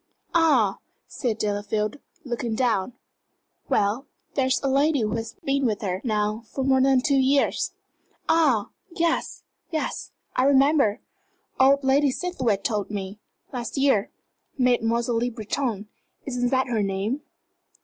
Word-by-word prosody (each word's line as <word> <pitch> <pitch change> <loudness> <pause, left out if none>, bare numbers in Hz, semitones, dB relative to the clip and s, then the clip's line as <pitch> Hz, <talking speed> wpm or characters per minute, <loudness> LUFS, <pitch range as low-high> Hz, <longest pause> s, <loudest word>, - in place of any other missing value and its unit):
"Ah!" 275 - +3 0.3
said 235 -5 -3
Delafield, 210 +4 -2 0.3
looking 240 -2 -2
down. 235 -3 0 0.8
"Well, 210 +7 +1 0.3
there 265 -2 +1
is 260 - +2
a - - +1
lady 280 +1 +2
who 215 -1 0
has 225 0 -6
been 275 0 0
with 215 -3 -2
her, 185 -1 -2
now, 215 -1 0
for 270 - -3
more 265 0 +3
than 265 -1 +4
two 275 0 +2
years 270 +1 +2 0.3
" - - -40
"Ah, 300 -10 +3 0.2
yes, 335 -2 -1 0.3
yes, 315 -2 -3 0.2
I 255 - +3
remember. 275 -5 +4 0.6
Old 275 +2 +5
Lady 275 +2 +3
Seathwaite 255 - -1
told 210 -3 -1
me 200 0 -5 0.3
last 245 +2 -4
year. 270 -7 +3 0.5
Mademoiselle 235 -2 +2
Le 245 +1 0
Breton 220 -1 -3 0.4
isn't 245 -2 -1
that 260 0 +2
her 235 -4 0
name? 200 +7 -1
245 Hz, 140 wpm, -25 LUFS, 215-275 Hz, 0.8 s, Old